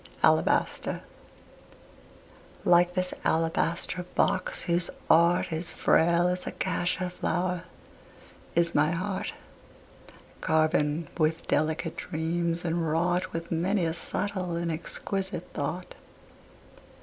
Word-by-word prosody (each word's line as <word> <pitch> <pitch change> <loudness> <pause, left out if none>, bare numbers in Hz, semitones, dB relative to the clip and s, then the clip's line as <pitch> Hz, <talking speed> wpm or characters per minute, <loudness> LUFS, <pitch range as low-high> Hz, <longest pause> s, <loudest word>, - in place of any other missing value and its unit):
ALABASTER - - +2 1.6
Like 175 +1 +5
this 185 0 0
alabaster 165 +2 0
box 185 - +2
whose 170 0 +1 0.2
art 170 +1 +4
Is 160 +2 -3
frail 170 +1 +3
as 180 0 -2
a - - -2
cassia 180 +1 -1
flower, 180 0 -1 0.9
is 170 0 +3
my 155 +3 +3
heart, 185 +3 -3 1.1
Carven 155 0 +2
with 160 +1 +1
delicate 160 +2 0
dreams 170 +2 -2
and 165 -1 0
wrought 175 +3 +1
With 165 0 -5
many 175 +3 +1
a 165 - 0
subtle 185 0 -2
and 170 0 -1
exquisite 190 +4 -3
thought. - - -4
170 Hz, 100 wpm, -28 LUFS, 165-180 Hz, 1.6 s, Like